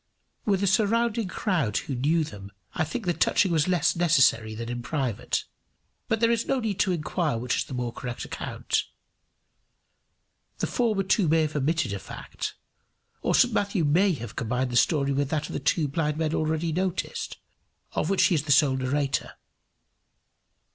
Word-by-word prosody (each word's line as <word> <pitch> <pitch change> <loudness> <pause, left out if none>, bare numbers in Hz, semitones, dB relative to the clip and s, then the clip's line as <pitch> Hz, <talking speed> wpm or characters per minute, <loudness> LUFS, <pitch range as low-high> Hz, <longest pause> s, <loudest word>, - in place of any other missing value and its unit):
With 200 -2 +1
a - - +3
surrounding 225 +2 +2
crowd 170 - 0
who 140 - -3
knew 150 +6 +2
them, 100 -8 -9 0.2
I 175 - 0
think 210 +8 -4
the 175 - +2
touching 190 +2 +2
was 160 -1 +2
less 180 -4 +2
necessary 130 -10 +3
than 115 +1 -5
in 120 0 -4
private; 125 -4 -2 0.6
but 225 - 0
there 230 0 +4
is 230 -1 0
no 270 - +1
need 215 -5 -2
to 190 - +3
inquire 160 -4 -1
which 125 +2 -1
is - - -1
the 130 - -7
more 120 -1 -3
correct 125 -1 -5
account. - - -2 1.7
The - - -1
former 220 -5 0
two 195 -1 +2
may 160 +1 +4
have 155 0 -3
omitted 150 -4 0
a 100 - -3
fact, - - -6 0.7
or - - +1
St - - +4
Matthew 200 -5 +1
may 180 +6 +3
have 120 -7 -7
combined 125 +1 -1
the - - -3
story 140 +2 +3
with 140 0 0
that 150 -1 -2
of - - -7
the - - -2
two 155 -4 +1
blind 150 +1 -1
men 160 -1 0
already 160 +1 0
noticed, 185 +1 -2 0.5
of - - -1
which 195 - +3
he - - +4
is 155 - +2
the 145 - -1
sole 140 -1 +5
narrator. 135 +2 -1
155 Hz, 180 wpm, -26 LUFS, 130-185 Hz, 1.7 s, sole